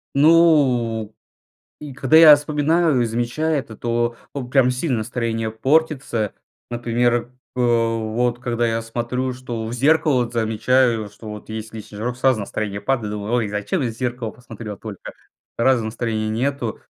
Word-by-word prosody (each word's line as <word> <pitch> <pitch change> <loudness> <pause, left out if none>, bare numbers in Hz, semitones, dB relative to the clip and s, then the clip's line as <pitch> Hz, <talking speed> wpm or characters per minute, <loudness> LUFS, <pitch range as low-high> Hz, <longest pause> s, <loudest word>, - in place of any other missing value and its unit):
Ну 135 -9 +4 0.7
и 145 -3 -8
когда 135 +3 +3
я 155 -2 +10
вспоминаю 150 -1 +1
и - - +2
замечаю 120 +7 -1
это, 115 -5 -6
то, 120 0 -1 0.2
а, 140 -3 -4
прям 125 0 +3
сильно 125 -2 -1
настроение 115 -1 -2
портится, 135 -3 0 0.4
например, 120 0 0 0.2
п 125 - -2 0.5
вот, 120 0 0
когда 120 -1 -1
я 115 0 -1
смотрю, 120 +3 -3
что 120 -3 -5
в 115 - -5
зеркало 140 0 +3
вот, 120 +1 -7
замечаю, 115 0 +1
что 110 +1 -13
вот 105 +1 -9
есть 110 0 -6
лишний 105 -1 -9
жирок, 120 +3 -3
сразу 130 -3 +2
настроение 100 0 -4
падает, 120 -6 -1
думаю: 105 +2 -4
"Ой, 115 -4 +1
зачем 105 - -2
я 120 - 0
в - - -6
зеркало 120 -2 -3
посмотрел 115 -4 -9
только?" 105 -4 -9 0.5
Сразу 125 -1 +3
настроения 110 -1 -2
нету. 125 0 -2
120 Hz, 155 wpm, -21 LUFS, 110-130 Hz, 0.7 s, я